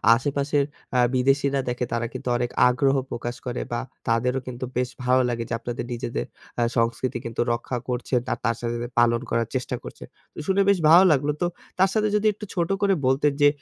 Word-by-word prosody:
আশেপাশের 140 +2 0 0.3
অ্যা 125 - +4
বিদেশিরা 135 +2 +2
দেখে, 125 0 -1
তারা 120 0 0
কিন্তু - - -6
অনেক 120 0 -1 0.2
আগ্রহ 135 +2 +2 0.2
প্রকাশ 120 +1 -4
করে 125 0 -3
বা 120 - -1 0.3
তাদেরও 125 +3 +1
কিন্তু 125 0 -5
বেশ 125 0 +1
ভালো 130 +1 +4
লাগে 115 -1 -2
যে - - -2
আপনাদের 120 0 -4
নিজেদের 120 0 -3 0.4
আ - - +4
সংস্কৃতি 120 +2 0 0.4
রক্ষা 120 +1 -3
করছে 125 +1 -3 0.2
আর - - -4
তার 115 0 +2
সাথে, 120 0 -2
সাথে 120 - -4
পালন 120 0 +3
করার 115 -1 0
চেষ্টা 125 0 -2
করছে। - - -9 0.4
শুনে 195 +1 +3
বেশ 200 - +5
ভালো 175 +4 +9
লাগলো। 145 +1 +2
তো 175 - +3 0.3
তার 190 - +5
সাথে 215 -1 +2
যদি 215 +1 +2
একটু 210 +1 -8
ছোট 170 -2 0
করে 200 -1 +4
বলতেন 140 +2 +3
যে 145 - +8
125 Hz, 195 wpm, -24 LUFS, 120-145 Hz, 0.4 s, ভালো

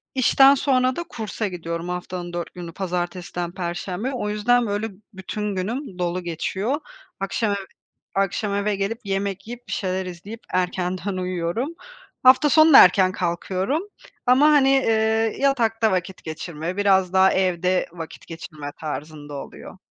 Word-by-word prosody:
işten 270 +2 +6
sonra 255 -2 +2
da 345 - -3
kursa 220 -1 -4
gidiyorum. 170 -1 -5
Haftanın 180 0 -5
4 175 -1 -4
günü 175 -2 -8
pazartesiden 175 -1 -3
perşembeye. 185 +6 -3
O 210 -4 -2
yüzden 235 +3 +2
böyle 205 +2 -2 0.2
bütün 205 +2 -4
günüm 205 +2 -4
dolu 180 +1 -1
geçiyor. 190 - -2 0.4
Akşam 205 +2 -1
eve 200 -1 -3 0.5
akşam 200 +1 0
eve 205 +1 0
gelip 200 +4 -2
yemek 195 0 -2
yiyip 245 +1 -9
bir - - -4
şeyler 190 -1 -2
izleyip 185 +5 -8
erkenden 185 +1 -1
uyuyorum. 185 - -2 0.5
Hafta 260 +3 +6
sonu 310 +2 +6
da - - +12
erken 185 0 +4
kalkıyorum. 185 - -1 0.4
Ama 255 +4 +5
hani, 285 -3 +5 0.2
iii, 220 0 +1
yatakta 230 -5 +2
vakit 185 0 -3
geçirme, 160 +2 -5
biraz 190 -2 +3
daha 190 0 +5
evde 185 -1 +1
vakit 165 -2 -9
geçirme 155 -3 -8
tarzında 150 -1 -6
oluyor. 140 - -9
190 Hz, 140 wpm, -23 LUFS, 175-225 Hz, 0.5 s, da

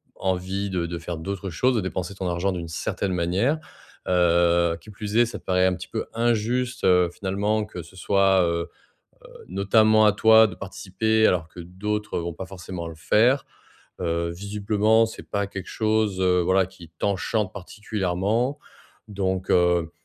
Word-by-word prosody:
envie 95 +2 -2
de 90 -3 -1
de 85 0 -4
faire 85 0 -5
d'autres 95 +3 -5
choses, 125 +10 +1
de 110 - +1
dépenser 95 0 -4
ton 95 -2 -3
argent 90 +3 0
d'une 85 -2 -5
certaine 95 +4 -3
manière, 90 - +1 0.5
heu, 85 -1 +3
qui 110 - -14
plus 105 +1 -4
est, 120 - +6
ça 120 - -7
te - - -27
paraît 90 0 +2
un 95 -1 +2
petit 90 +1 -9
peu 110 - -3
injuste, 120 +2 0
heu, 90 -1 +4
finalement, 105 +3 -1
que 90 -5 -8
ce 95 +4 -16
soit, 95 -1 +3
heu 85 0 -1 0.6
heu, - - -14
notamment 110 +3 +4
à 105 - +5
toi 110 +1 +6
de 90 - -9
participer, 100 +3 0
alors 85 -3 0
que 90 - -11
d'autres 105 +5 -3
vont 85 0 -3
pas 90 +3 -7
forcément 90 -2 -7
le 80 - -10
faire. 120 - +3 0.6
Heu, 85 -1 -1
visiblement 105 +4 +1
c'est 110 - -10
pas 100 -1 -1
quelque 95 -2 -7
chose, 110 -3 0
heu, 90 -1 +3
voilà, 95 +1 +3
qui 95 -3 -14
t'enchante 100 0 -1
particulièrement, 105 +6 -2 0.5
donc 95 -2 -2
heu, 90 -2 +3
95 Hz, 170 wpm, -24 LUFS, 90-105 Hz, 0.6 s, est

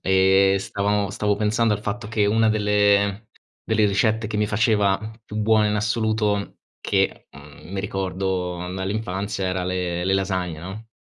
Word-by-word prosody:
e 95 +1 +4
stavamo 100 +1 -1
stavo 105 -1 0
pensando 110 +1 +1
al 105 - -5
fatto 105 +1 -4
che 110 -2 +1
una 110 +2 +3
delle 105 -1 +2 0.4
delle 110 -1 +3
ricette 110 +2 +1
che 105 0 -4
mi 105 0 +1
faceva 105 -2 +2 0.3
più 105 - -8
buone 110 0 +3
in 105 - 0
assoluto, 105 -1 0 0.2
che, - - -1
mhmm, 75 +5 -14
mi 95 - -2
ricordo 95 -2 -2 0.2
dall'infanzia 95 +1 -3
era 90 0 -1
le 90 -1 -2
le 95 +1 +2
lasagne, 95 -4 -1
no. 95 +7 -8
100 Hz, 155 wpm, -23 LUFS, 95-110 Hz, 0.4 s, e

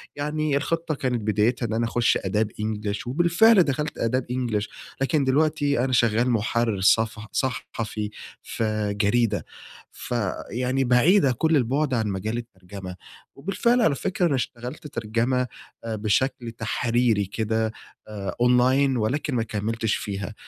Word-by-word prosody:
يعني 150 0 -1
الخطّة 165 +2 -1
كانت 125 -4 -1
بدايتها 110 +4 +1
إن 110 - -3
أنا 115 +1 +1
أخش 120 +1 +2
أداب 105 +3 -1
إنجلش، 105 0 -3
وبالفعل 175 - +5
دخلت 150 +1 -2
أداب 125 +2 0
إنجلش 115 -4 -1 0.3
لكن 140 +2 +2
دلوقتي 145 0 +2
أنا 130 -1 -1
شغّال 115 +1 +3
محرر 115 -2 0
صفح 110 +1 +2
صحفي 115 -4 -3 0.3
في 110 -2 -2
جريدة، 110 0 +1 0.5
فيعني 120 +3 -3
بعيدة 135 +5 +4
كل 160 +6 +1
البعد 135 +2 0
عن 110 -3 +1
مجال 105 +4 -2
الترجمة، 95 -4 -8 0.4
وبالفعل 235 - +1
على 155 -10 +3
فكرة 180 +5 -1
أنا 155 -5 +2
اشتغلت 125 +4 -5
ترجمة 120 +2 -1 0.4
آآ 115 -1 -3
بشكل 115 +3 0
تحريري 115 -1 0
كده 110 +2 -1 0.4
آآ، 100 -2 -5
أونلاين 130 +2 +4
ولكن 130 +5 -1
ما 115 - +1
كملتش 110 +1 -1
فيها، 100 +1 -5
120 Hz, 130 wpm, -24 LUFS, 110-135 Hz, 0.5 s, وبالفعل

